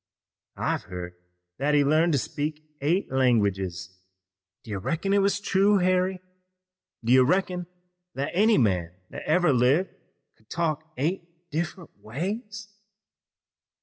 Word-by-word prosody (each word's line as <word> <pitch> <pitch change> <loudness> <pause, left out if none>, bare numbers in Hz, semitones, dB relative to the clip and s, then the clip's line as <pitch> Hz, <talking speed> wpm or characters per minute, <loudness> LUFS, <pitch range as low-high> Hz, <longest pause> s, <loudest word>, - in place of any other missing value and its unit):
I've - - -1
heard 90 -1 -7 0.5
that 145 +2 +2
he 145 - +5
learned 155 +4 +3
to - - +3
speak 150 +3 -3 0.2
eight 170 +7 0
languages. 100 -8 0 0.6
Do 110 - -10
you 100 - -2
reckon 170 - -1
it 200 - +4
was 200 0 +2
true, 200 0 +3
Harry? 185 0 +1 0.8
Do 115 +2 +3
you 130 0 +7
reckon 180 +3 0 0.5
that 140 +3 -2
any 215 +5 +4
man 90 -7 +1 0.2
that - - -7
ever 160 -1 +3
lived 130 +9 +3 0.5
could 110 - -31
talk 160 -2 -2
eight 170 +3 -4
different 170 +2 -4
ways?" 205 - -5
155 Hz, 130 wpm, -26 LUFS, 125-185 Hz, 0.8 s, you